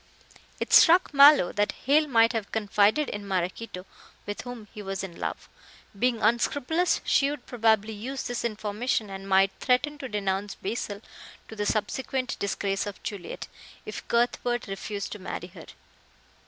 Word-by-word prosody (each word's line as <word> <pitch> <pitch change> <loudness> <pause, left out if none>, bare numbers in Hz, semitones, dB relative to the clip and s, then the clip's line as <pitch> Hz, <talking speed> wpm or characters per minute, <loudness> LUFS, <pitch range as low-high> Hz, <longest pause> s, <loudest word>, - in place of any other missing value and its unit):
It - - -3
struck 345 -1 +7
Mallow 280 -8 +7
that 205 0 0
Hale 300 +3 +4
might 230 -3 +4
have 220 -3 -3
confided 210 +6 +2
in 205 -1 -6
Maraquito, 185 +1 -3 0.4
with 205 - -5
whom 245 -4 -9
he 210 - -8
was 195 -1 -4
in 175 -3 -8
love. - - -4 0.5
Being 240 -1 +1
unscrupulous, 285 +9 +1
she 275 - +3
would 290 -3 -6
probably 220 -2 +1
use 255 +6 -5
this 245 -1 -3
information, 215 0 -2
and 195 0 -7
might 195 0 +4
threaten 285 +3 +1
to 265 - -6
denounce 200 -1 -2
Basil, 205 0 -4 0.5
to 220 - -8
the 205 -1 -2
subsequent 255 +4 -1
disgrace 200 0 -1
of 205 - -8
Juliet, 200 -4 -6 0.4
if - - -7
Cuthbert 240 0 0
refused 200 0 -5
to 210 - -6
marry 180 -1 -6
her. 170 -3 -13
215 Hz, 155 wpm, -27 LUFS, 200-250 Hz, 0.5 s, struck